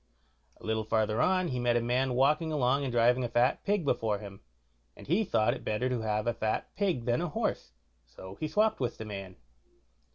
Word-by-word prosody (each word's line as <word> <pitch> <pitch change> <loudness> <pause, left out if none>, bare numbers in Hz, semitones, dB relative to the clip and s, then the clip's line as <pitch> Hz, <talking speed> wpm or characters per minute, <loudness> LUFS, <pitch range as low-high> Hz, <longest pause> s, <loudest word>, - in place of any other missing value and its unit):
A - - -13
little 110 0 0
farther 110 0 +1
on 185 -1 +2
he 125 - -2
met 120 -1 +2
a - - +4
man 125 +2 0
walking 150 +5 +2
along 140 -2 +2
and 135 - -2
driving 120 +2 +3
a 120 - -2
fat 120 +3 +2
pig 205 -5 0
before 115 -6 0
him, 100 -1 -10 0.6
and - - -12
he 180 +9 +2
thought 110 - +2
it - - -8
better 110 +4 -1
to 125 -3 -1
have 105 -1 -1
a 120 - +1
fat 110 -1 -3
pig 185 - 0
than 120 +4 +1
a 175 - -2
horse, - - -3 0.3
so 95 +10 -11
he 155 - -2
swopped 215 +6 +2
with 125 -3 -2
the 110 - -7
man. 100 -3 -7
120 Hz, 215 wpm, -30 LUFS, 110-145 Hz, 0.6 s, a